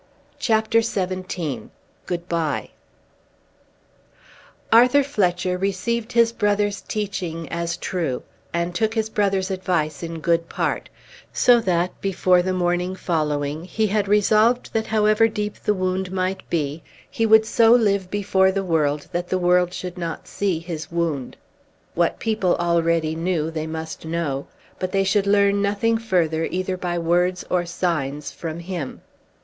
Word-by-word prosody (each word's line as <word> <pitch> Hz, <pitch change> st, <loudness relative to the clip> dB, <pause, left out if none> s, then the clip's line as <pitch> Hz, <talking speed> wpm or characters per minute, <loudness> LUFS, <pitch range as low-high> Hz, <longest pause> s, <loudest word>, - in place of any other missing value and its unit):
CHAPTER 220 Hz, 0 st, +2 dB
XVII 185 Hz, -, -3 dB, 0.4 s
Good 175 Hz, -1 st, -3 dB
Bye 165 Hz, -4 st, -1 dB, 2.0 s
Arthur 250 Hz, +5 st, +6 dB
Fletcher 180 Hz, -8 st, 0 dB
received 220 Hz, +5 st, -1 dB
his 230 Hz, -1 st, +4 dB
brother's 205 Hz, -2 st, 0 dB
teaching 185 Hz, -6 st, -4 dB
as 170 Hz, 0 st, -2 dB
true, 165 Hz, -9 st, -2 dB, 0.3 s
and 170 Hz, +1 st, -1 dB
took 220 Hz, +5 st, 0 dB
his 220 Hz, -1 st, -1 dB
brother's 195 Hz, -2 st, 0 dB
advice 180 Hz, -5 st, -1 dB
in 165 Hz, -1 st, -5 dB
good 165 Hz, +1 st, +1 dB
part; -, -, -2 dB, 0.4 s
so 245 Hz, -1 st, +5 dB
that, 180 Hz, -4 st, -1 dB
before 185 Hz, -2 st, +3 dB
the 185 Hz, +1 st, -1 dB
morning 180 Hz, 0 st, 0 dB
following, 150 Hz, -4 st, -1 dB
he 220 Hz, +4 st, 0 dB
had 210 Hz, -1 st, 0 dB
resolved 215 Hz, +4 st, +3 dB
that 220 Hz, 0 st, 0 dB
however 215 Hz, +1 st, +3 dB
deep 210 Hz, -1 st, -3 dB
the 210 Hz, -, +1 dB
wound 185 Hz, 0 st, -1 dB
might 190 Hz, 0 st, -2 dB
be, 155 Hz, -1 st, -1 dB, 0.3 s
he 225 Hz, -, 0 dB
would 220 Hz, 0 st, +6 dB
so 225 Hz, 0 st, +4 dB
live 200 Hz, -6 st, +3 dB
before 190 Hz, -1 st, +2 dB
the 195 Hz, 0 st, -1 dB
world, 150 Hz, -4 st, 0 dB
that 175 Hz, 0 st, -3 dB
the 185 Hz, -, +1 dB
world 180 Hz, 0 st, +3 dB
should 180 Hz, 0 st, -6 dB
not 165 Hz, -2 st, -5 dB
see 195 Hz, -4 st, -1 dB
his 165 Hz, -1 st, -6 dB
wound. 165 Hz, -6 st, -2 dB, 0.6 s
What 170 Hz, 0 st, +1 dB
people 215 Hz, -5 st, +1 dB
already 170 Hz, -2 st, +1 dB
knew 165 Hz, -1 st, -1 dB
they 160 Hz, -1 st, -4 dB
must 160 Hz, 0 st, -6 dB
know, 160 Hz, -4 st, -2 dB, 0.3 s
but 185 Hz, 0 st, -3 dB
they 195 Hz, 0 st, +3 dB
should 195 Hz, +1 st, +1 dB
learn 200 Hz, 0 st, +3 dB
nothing 205 Hz, +3 st, +1 dB
further 165 Hz, -7 st, +1 dB
either 185 Hz, +1 st, -2 dB
by 175 Hz, -1 st, -3 dB
words 175 Hz, +2 st, +1 dB
or 175 Hz, -1 st, +1 dB
signs 150 Hz, -5 st, -2 dB
from 165 Hz, 0 st, -6 dB
him. 170 Hz, -6 st, -5 dB
185 Hz, 145 wpm, -22 LUFS, 170-205 Hz, 2.0 s, Arthur